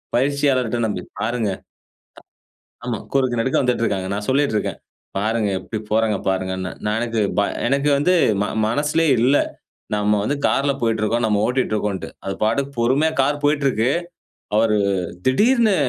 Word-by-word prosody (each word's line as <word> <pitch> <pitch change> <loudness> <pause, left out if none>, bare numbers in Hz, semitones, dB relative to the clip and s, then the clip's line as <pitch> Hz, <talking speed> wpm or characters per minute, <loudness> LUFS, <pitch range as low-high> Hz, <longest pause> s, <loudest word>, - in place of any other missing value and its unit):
பயிற்சியாளர்ட 130 -2 +1
நம்பி 105 - -3 0.2
பாருங்க. 115 -2 -1 1.3
த - - -13
ஆமா 120 -3 -2
குறுக்க 130 -3 +2
நடுக்க 130 +3 0
வந்துட்டு 125 -2 +1
இருக்காங்க. 95 -3 -1
நான் 105 +1 -3
சொல்லிட்டு 140 -3 +2
இருக்கேன், - - -2 0.4
பாருங்க 110 +1 0
எப்டி 110 +4 -5
போறாங்க 110 -1 +2
பாருங்கனே. 95 0 -2
நான் 105 +1 0
எனக்கு, 115 -1 -1 0.2
ப 100 - +5 0.3
எனக்கு 140 +2 +1
வந்து, 180 +6 +3 0.3
ம - - 0 0.2
மனசுலே 150 +6 +1
இல்ல. 130 +4 +4 0.6
நாம 105 0 +2
வந்து 145 - 0
கார்ல 140 +1 +2
போயிட்டு 115 -1 +1
இருக்கிறோம். 115 +2 +1
நம்ம 105 -2 +1
ஓட்டிகிட்டு 125 -3 0
இருக்கோம்ட்டு. 105 -2 -3 0.2
அது 95 - -2
பாட்டுக்கு 135 +6 0
பொறுமையா 140 +7 +2
கார் 145 +2 +1
போயிட்டு 145 -1 +2
இருக்கு. 115 +1 +1 0.7
அவரு 110 -1 +3 0.5
திடீர்னு, 220 - +4
120 Hz, 150 wpm, -21 LUFS, 105-140 Hz, 1.3 s, ப